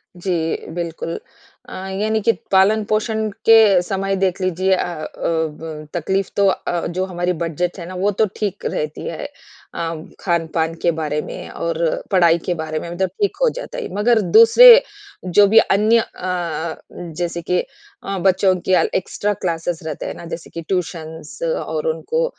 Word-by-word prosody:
जी 180 +1 -4 0.4
बिल्कुल। 170 -1 -4 0.5
अ, - - -9 0.3
यानी 220 +1 +1
कि 230 +3 +4 0.2
पालन-पोषण 215 +2 +2 0.2
के 220 -5 +7
समय 195 +2 -2
देख 190 -1 0
लीजिए 185 +1 +1
अ - - -1
अ, 165 -3 -5 0.2
ब 160 -1 -3
तकलीफ 190 +3 -1
तो 200 -1 +3
अ, 175 -2 -1
जो 185 +2 -2
हमारी 180 -1 -2
बजट 175 +3 -2
है 170 - -6
ना 185 - -8
वो 195 +3 +1
तो - - +6
ठीक 205 -2 -4
रहती 155 0 -3
है, - - -5 0.5
अ, 165 0 -3 0.3
खान-पान 165 -2 -1
के 170 - +3
बारे 150 -1 -1
में - - -8
और 165 -1 -2
पढ़ाई 170 -3 +5
के 180 - 0
बारे 155 -2 -4
में 170 - -7
मतलब 180 +2 -1
ठीक 405 - +1
हो - - +5
जाता - - -7
है। 475 -4 -5
मगर 220 +2 +3 0.2
दूसरे 485 - +9 0.4
जो 185 +3 +5
भी 220 +3 +3
अन्य 215 +3 +3
अ, 170 -5 -3 0.4
जैसे 175 -1 -2
के 180 +2 0 0.4
अ, 195 -1 -3
बच्चों 190 0 +3
के - - +3 0.3
एक्स्ट्रा 205 +2 -2
क्लासेस 170 -3 -3
रहते 155 -3 -5
हैं - - -4
ना - - -10
जैसे 165 - -13
कि 165 - -7
ट्यूशंस 160 - -5
और - - -2
उनको 480 0 -1
180 Hz, 165 wpm, -20 LUFS, 165-205 Hz, 0.5 s, दूसरे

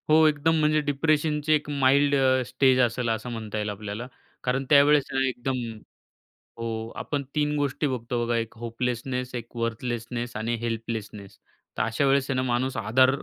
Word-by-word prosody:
हो 160 +1 +6
एकदम 155 +2 +2
म्हणजे 155 0 +3
डिप्रेशनची 150 +1 +1
एक 150 -1 0
माईल्ड 140 0 +3
अ, 130 -1 +3
स्टेज 130 +1 +3
असेल 120 -1 +1
असं 110 +2 -2
म्हणता 110 -2 -5
येईल 105 0 -1
आपल्याला. 105 +3 -5 0.4
कारण 130 +2 0
त्यावेळेस 145 0 +6
ना 135 0 +2
एकदम 130 +1 -2 1.0
हो 115 0 -4 0.3
आपण 145 -2 -3
3 150 0 +1
गोष्टी 145 +1 0
बघतो 120 -2 -2
बघा. 120 0 0
एक 115 -1 -3
होपलेसनेस, 125 +2 -3
एक 120 0 -7
वर्थलेसनेस 120 +1 -3
आणि 115 +2 -1
हेल्पलेसनेस. 110 -3 -5 0.4
तर - - +1
अशा 115 +5 0
वेळेस 135 0 +2
आहे 135 - 0
ना, 130 - +1
माणूस 125 +1 0
आधार 115 +4 +4
125 Hz, 165 wpm, -26 LUFS, 115-140 Hz, 1.0 s, हो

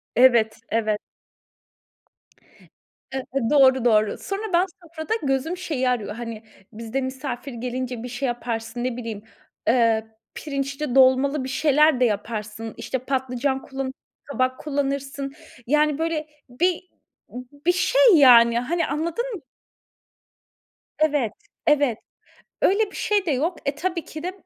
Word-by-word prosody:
Evet, 235 -3 +5
evet. 215 -2 0 2.2
Eee, 265 - -3 0.3
doğru 265 -3 +5
doğru. 215 -3 +3
Sonra 395 +2 -4
ben 355 +2 +4 0.2
sofrada, 335 +5 -4
gözüm 275 +6 0
şeyi 295 -8 -1
arıyor; 220 -4 -1
hani 230 -1 -7 0.3
bizde 230 +4 -4
misafir 260 0 -5
gelince, 250 0 -4
bir 250 - -6
şey 250 +3 -3
yaparsın, 240 0 -3
ne 255 -2 -2
bileyim, 225 -4 -6 0.5
eee, 225 -2 +3 0.3
pirinçli 275 -1 -3
dolmalı 265 +1 +4
bir 260 - -5
şeyler 300 0 +3
de 250 - +5
yaparsın, 215 0 -3
işte 260 - -3
patlıcan 265 +1 -1
kullanırsın, 265 -1 -5 0.3
kabak 255 -2 -1
kullanırsın. 275 -1 -3 0.3
Yani 300 +1 +2
böyle 320 -2 -2 0.2
bir 350 +8 0 0.8
bir 355 - +6
şey - - +2 0.2
yani, 235 -4 +7
hani, 325 +7 -1
anladın 325 - -2
mı? 385 - -7 1.6
Evet, 295 -7 +2 0.4
evet 285 -6 +3 0.7
öyle 405 +2 +3
bir - - -11
şey 410 -3 +1
de - - +1
yok. 310 +6 0
Eee, 280 - 0
tabii 340 +2 -3
ki 310 0 -8
de, 365 +1 -3
265 Hz, 130 wpm, -23 LUFS, 240-300 Hz, 2.2 s, yani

